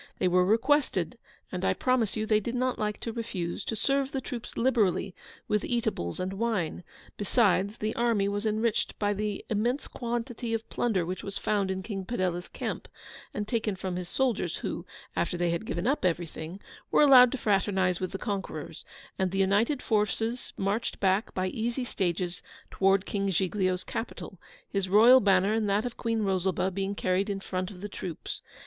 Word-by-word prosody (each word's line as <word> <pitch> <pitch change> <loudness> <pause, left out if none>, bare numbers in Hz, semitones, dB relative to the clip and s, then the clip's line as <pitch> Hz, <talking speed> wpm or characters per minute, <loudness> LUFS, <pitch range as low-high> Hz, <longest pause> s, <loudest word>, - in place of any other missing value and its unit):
They - - +2
were 180 0 +4
requested, 260 +9 +2 0.3
and - - -4
I - - +2
promise 250 -5 +1
you 215 - 0
they 215 -1 +3
did 235 +4 -4
not 255 0 0
like 210 -1 -1
to 230 - -3
refuse, 195 -7 -3
to 225 - -2
serve 275 +4 +1
the 270 - -1
troops 245 -2 -7
liberally 215 -6 +2 0.3
with 210 -1 +1
eatables 220 - -1
and 185 +1 -2
wine; 205 -8 -1 0.3
besides, 205 -1 +2
the 215 +1 -2
army 230 -4 +2
was 205 +1 -1
enriched 215 +1 0
by 205 -1 +1
the 205 0 -3
immense 235 +6 0
quantity 240 -1 -3
of 225 0 -5
plunder 200 -8 +1
which 185 +2 -4
was 200 0 -3
found 200 -2 0
in 190 0 -2
King 195 -2 -4
Padella's 185 -4 -2
camp, - - -5 0.4
and 210 0 -3
taken 220 -3 0
from 185 -1 -4
his 180 -1 -4
soldiers; 225 -10 0
who 175 - -4 0.3
(after 175 - 0
they 175 -1 +1
had 170 +6 -2
given 170 +3 -2
up 275 +4 +1
everything) 170 0 -2 0.3
were - - +5
allowed 255 -4 +8
to - - -1
fraternise 195 -4 +1
with 185 - -3
the 195 - -3
conquerors; 200 -3 -4 0.4
and 190 -1 +2
the 195 - -3
united 205 +8 +2
forces 225 +2 0
marched 200 +4 -1
back 195 +2 +2
by 185 - 0
easy 235 +6 -2
stages 180 -5 -2 0.3
towards 195 0 +3
King 200 -1 -1
Giglio's 185 0 0
capital, 200 -5 -6 0.3
his 195 -2 -1
royal 230 +6 +8
banner 195 -1 +4
and 220 -2 +1
that 205 +4 +2
of 245 - -4
Queen 225 -2 -1
Rosalba 190 -1 +1
being 195 +2 -2
carried 190 +2 +1
in 200 -1 -2
front 185 -1 -3
of 185 -3 -11
the 205 - -4
troops. 180 -5 -6
205 Hz, 180 wpm, -29 LUFS, 185-230 Hz, 0.4 s, allowed